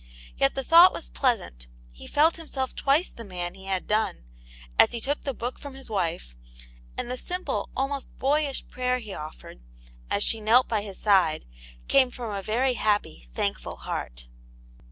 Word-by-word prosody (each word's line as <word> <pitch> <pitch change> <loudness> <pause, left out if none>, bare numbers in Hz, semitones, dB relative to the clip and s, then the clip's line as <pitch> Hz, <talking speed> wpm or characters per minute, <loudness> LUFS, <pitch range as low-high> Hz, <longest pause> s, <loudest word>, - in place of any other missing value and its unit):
Yet 135 - +2
the 270 - -2
thought 340 +6 +8
was - - -5
pleasant; 195 - -1 0.2
he - - -12
felt 315 +3 +3
himself 275 -5 -4
twice 285 +6 +2
the 230 - -10
man 180 -4 -5
he 190 0 -12
had 190 -1 -1
done, 210 - 0 0.6
as - - +6
he 235 - -2
took 285 +5 -2
the 275 - -2
book 245 +3 -5
from 285 -2 -9
his 270 -4 -9
wife, 165 - -2 0.6
and 240 - -3
the 255 - -3
simple, 360 +7 -3
almost 275 +1 -3
boyish 280 0 0
prayer 250 0 0
he 215 -5 -8
offered, 150 - -9 0.5
as 200 - +1
she 225 - +1
knelt 230 +4 +5
by 220 -3 0
his 200 -2 -8
side, 185 - +3 0.4
came 265 -2 +5
from 235 -4 -6
a 200 - -3
very 245 +6 +1
happy, 205 - -1
thankful - - -2
heart. - - -5
230 Hz, 175 wpm, -26 LUFS, 190-270 Hz, 0.6 s, thought